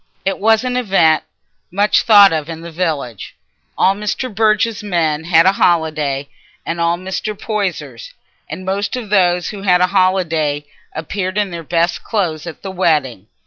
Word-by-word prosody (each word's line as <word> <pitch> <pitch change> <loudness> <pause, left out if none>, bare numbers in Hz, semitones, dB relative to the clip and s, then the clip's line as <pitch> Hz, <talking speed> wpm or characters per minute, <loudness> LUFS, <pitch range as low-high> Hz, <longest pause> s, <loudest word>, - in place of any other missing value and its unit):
It 195 - -1
was 220 +2 +3
an 250 0 -2
event 185 -9 +2 0.4
much 205 +3 +2
thought 205 -4 +7
of 155 0 -3
in 165 0 -7
the 170 0 -9
village. 150 - -4 0.4
All 190 - +3
Mr. 210 +4 -4
Burge's 215 +1 +1
men 160 -6 -1
had 165 0 +4
a 190 - +6
holiday, 155 -7 0 0.4
and 170 0 -3
all 170 +1 +1
Mr. 190 +3 -5
Poyser's, 215 - -4 0.4
and 185 - -7
most 200 +3 -2
of 230 -5 -7
those 180 -3 +2
who 205 -2 -7
had 180 -2 +3
a 180 - +4
holiday 165 -6 +1 0.3
appeared 185 +4 -4
in 205 -3 0
their 170 -1 -6
best 170 +2 -1
clothes 175 -7 -2
at 165 - -9
the 195 - -5
wedding. 150 - 0
180 Hz, 165 wpm, -17 LUFS, 160-205 Hz, 0.4 s, thought